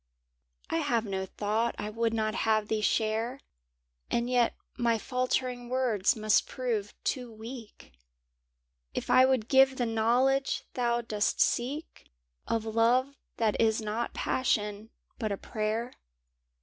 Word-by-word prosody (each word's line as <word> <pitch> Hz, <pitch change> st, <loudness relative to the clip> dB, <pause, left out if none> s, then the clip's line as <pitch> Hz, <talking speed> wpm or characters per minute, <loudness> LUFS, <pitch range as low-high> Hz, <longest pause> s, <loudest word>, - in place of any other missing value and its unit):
I -, -, +1 dB
have 230 Hz, +6 st, +1 dB
no 190 Hz, -2 st, -3 dB
thought 215 Hz, +4 st, -1 dB
I 210 Hz, +1 st, -4 dB
would 230 Hz, +1 st, 0 dB
not 215 Hz, -1 st, 0 dB
have 215 Hz, -1 st, +1 dB
thee 220 Hz, -1 st, 0 dB
share. 225 Hz, +4 st, 0 dB, 0.7 s
And 235 Hz, +1 st, 0 dB
yet 245 Hz, -2 st, +3 dB, 0.2 s
my 235 Hz, -1 st, +2 dB
faltering 250 Hz, 0 st, -2 dB
words 245 Hz, -6 st, +2 dB
must 215 Hz, -1 st, +2 dB
prove 230 Hz, -6 st, -3 dB
too 250 Hz, -3 st, -2 dB
weak 225 Hz, 0 st, -10 dB, 1.0 s
If -, -, -2 dB
I 255 Hz, -, +7 dB
would 255 Hz, -4 st, +1 dB
give 265 Hz, 0 st, +5 dB
the 245 Hz, -, +1 dB
knowledge 245 Hz, +5 st, +2 dB
thou 240 Hz, -1 st, +1 dB
dost 215 Hz, -3 st, -1 dB
seek 275 Hz, +7 st, -1 dB, 0.4 s
Of 225 Hz, -1 st, -1 dB
love 240 Hz, +5 st, +2 dB, 0.2 s
that 220 Hz, -2 st, +1 dB
is 220 Hz, -1 st, +3 dB
not 220 Hz, +2 st, -3 dB
passion, 210 Hz, -4 st, -1 dB, 0.3 s
but 215 Hz, -4 st, -1 dB
a 200 Hz, -, -1 dB
prayer. 220 Hz, +4 st, -2 dB
230 Hz, 135 wpm, -29 LUFS, 215-250 Hz, 1.0 s, I